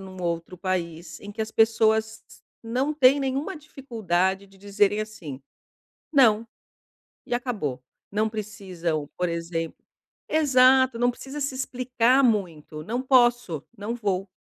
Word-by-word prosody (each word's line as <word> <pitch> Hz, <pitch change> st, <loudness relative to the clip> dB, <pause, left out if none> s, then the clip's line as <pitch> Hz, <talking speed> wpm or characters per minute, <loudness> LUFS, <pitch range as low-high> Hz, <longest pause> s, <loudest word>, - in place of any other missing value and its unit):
num 190 Hz, -1 st, -10 dB
outro 170 Hz, +1 st, -3 dB
país 170 Hz, -3 st, -3 dB
em 205 Hz, 0 st, -9 dB
que 220 Hz, -, -7 dB
as 220 Hz, -, -2 dB
pessoas 220 Hz, 0 st, +2 dB, 0.4 s
não 255 Hz, +6 st, -1 dB
têm 275 Hz, -1 st, +5 dB
nenhuma 275 Hz, +7 st, -2 dB
dificuldade 200 Hz, -, -2 dB
de 195 Hz, 0 st, -21 dB
dizerem, 205 Hz, +1 st, +1 dB
assim: 170 Hz, -11 st, -7 dB, 0.7 s
"Não". 230 Hz, -6 st, +5 dB, 0.8 s
E 240 Hz, -, -1 dB
acabou, 205 Hz, -, -3 dB, 0.3 s
não 215 Hz, +2 st, +1 dB
precisam, 185 Hz, -8 st, -4 dB
por 180 Hz, -1 st, 0 dB
exemplo 165 Hz, -1 st, -3 dB, 0.5 s
Exato, 260 Hz, -4 st, +5 dB
não 245 Hz, +1 st, +3 dB
precisa 270 Hz, +4 st, -8 dB
se 275 Hz, -1 st, -2 dB
explicar 255 Hz, 0 st, +2 dB
muito, 170 Hz, -, -1 dB
"não 240 Hz, +6 st, -2 dB
posso, 240 Hz, -, +3 dB
não 210 Hz, +3 st, -4 dB
vou", 200 Hz, -4 st, -2 dB
215 Hz, 130 wpm, -25 LUFS, 180-255 Hz, 0.8 s, têm